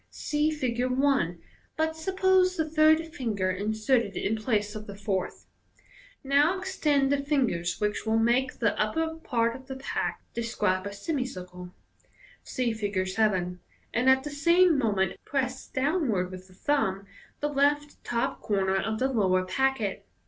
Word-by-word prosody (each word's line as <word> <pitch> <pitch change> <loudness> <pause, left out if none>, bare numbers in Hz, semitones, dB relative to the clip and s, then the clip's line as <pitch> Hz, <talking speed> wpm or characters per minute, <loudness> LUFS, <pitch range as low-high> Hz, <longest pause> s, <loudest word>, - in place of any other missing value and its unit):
(See 300 +1 0
Fig. 255 -6 -2
i, 255 -8 +1 0.4
but 320 0 0
suppose 375 +2 +2
the 320 -1 0
third 315 +1 +3
finger 210 - -1
in 205 +4 -2
serted 220 -2 +1
in 215 - 0
place 215 -2 -1
of 215 -1 -8
the 200 - -8
fourth.) 195 -2 -3 0.8
Now 290 +6 +3
extend 295 -7 +1
the 285 0 +2
fingers, 245 - 0
which 210 0 -1
will 220 0 +1
make 240 +3 +2
the 220 -3 +1
upper 320 +10 0
part 235 -6 0
of 260 0 -12
the 265 - -5
pack 265 +1 -3
describe 200 -5 -1
a - - -5
semicircle 185 - -5 0.7
(see 245 -3 -1
Fig. 200 -4 -2
7), 185 -4 0 0.3
and 250 +3 +3
at 265 0 +4
the 295 - -5
same 340 +4 +4
moment 200 -8 0
press 260 -2 -2
downward 260 - 0
with 185 0 -9
the 185 - -19
thumb 195 -6 0 0.3
the 295 - -1
left 290 +1 0
top 245 +3 -2
corner 195 -2 +1
of 220 +3 -1
the 260 - +1
lower 190 -7 +2
packet. 235 0 -1
245 Hz, 155 wpm, -27 LUFS, 200-290 Hz, 0.8 s, at